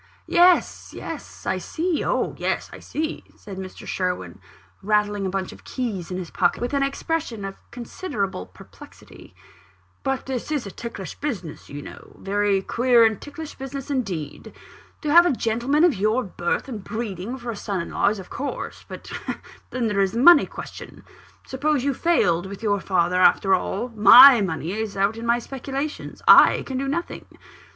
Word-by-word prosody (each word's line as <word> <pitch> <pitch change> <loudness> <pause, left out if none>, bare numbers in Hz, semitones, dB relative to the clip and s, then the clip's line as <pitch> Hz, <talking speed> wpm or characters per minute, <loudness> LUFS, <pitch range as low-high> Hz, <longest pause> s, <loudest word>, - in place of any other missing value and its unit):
"Yes, 355 0 +3
yes; - - -8
I - - -1
see 335 -1 -2
oh, - - 0
yes, - - -2
I - - -9
see!" 315 +1 -4
said 200 -3 -10
Mr. 190 -1 -9
Sherwin, 140 - -3 0.4
rattling 205 -1 +1
a - - -2
bunch 190 0 -3
of - - -14
keys 215 -9 -4
in 180 - -4
his 180 -3 -6
pocket, 175 -2 +1
with 245 +3 -3
an 280 - +1
expression 275 -5 -2
of 195 - -5 0.2
considerable 230 - -5
perplexity; - - -16 0.7
"but 270 -1 -2
this 265 +2 -4
is 290 -6 -1
a 200 - -7
ticklish 200 -5 -7
business, 195 - -5
you 145 0 -7
know - - -12
a - - -21
very 200 -1 0
queer 240 +1 +3
and 220 -2 0
ticklish 300 +1 -8
business 275 +1 -7
indeed. 185 - -4 0.5
To 300 - -1
have 345 +3 +7
a - - +2
gentleman 245 +5 +1
of 350 -4 +5
your 215 +5 +1
birth 175 +2 -3
and 225 -7 -7
breeding 220 +1 -5
for 240 -2 -5
a - - -6
son 200 -1 -3
in 170 - -5
law, - - +1
is 210 - -3
of 190 - -11
course 280 +2 -5
but - - -10 0.6
then 250 -2 -2
there 205 -3 +1
is 195 -1 +1
the 230 - -1
money 345 +7 +7
question. - - -10 0.4
Suppose 280 0 -1
you 280 0 +1
failed 190 - +1
with 200 +3 -9
your 205 -2 +1
father 180 -2 +1
after 195 +1 +4
all 195 +5 -1
my 235 +3 +9
money 165 -2 -3
is 215 -1 -4
out 200 +3 +1
in 230 +1 -6
my 235 +1 +3
speculations 275 +4 -6
I - - +7
can 260 -1 -4
do 275 - -2
nothing. 340 +5 -4
225 Hz, 180 wpm, -23 LUFS, 195-270 Hz, 0.7 s, my